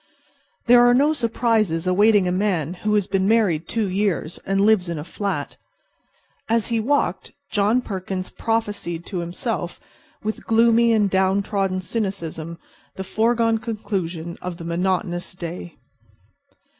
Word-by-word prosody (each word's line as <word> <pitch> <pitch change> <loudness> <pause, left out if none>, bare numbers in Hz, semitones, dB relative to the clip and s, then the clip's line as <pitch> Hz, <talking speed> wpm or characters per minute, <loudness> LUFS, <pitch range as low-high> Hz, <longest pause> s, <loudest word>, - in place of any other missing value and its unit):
There 240 0 +7
are 245 0 +5
no 290 +4 +4
surprises 225 - 0
awaiting 200 +1 +4
a - - +1
man 180 -5 0
who 210 +3 -1
has 205 -2 +2
been 190 0 0
married 200 -8 +2
two 225 -3 -1
years 190 -4 -1
and 195 0 +1
lives 205 -4 +3
in 170 - -3
a 150 - -4
flat. 200 +4 -4 0.9
As 230 0 +2
he 230 -1 +1
walked 280 +6 0 0.2
John 215 +4 +2
Perkins 190 -3 -5
prophesied 205 -7 -2
to 185 - -4
himself 175 +2 -3 0.4
with 215 +1 -4
gloomy 230 +1 +4
and 215 -2 +3
downtrodden 190 0 +1
cynicism 170 -6 -4 0.4
the 190 - -5
foregone 225 +2 +1
conclusions 190 -7 -4
of 180 -2 -5
the 170 - -8
monotonous 175 +1 -1
day. 175 -1 -7
200 Hz, 135 wpm, -22 LUFS, 180-225 Hz, 0.9 s, There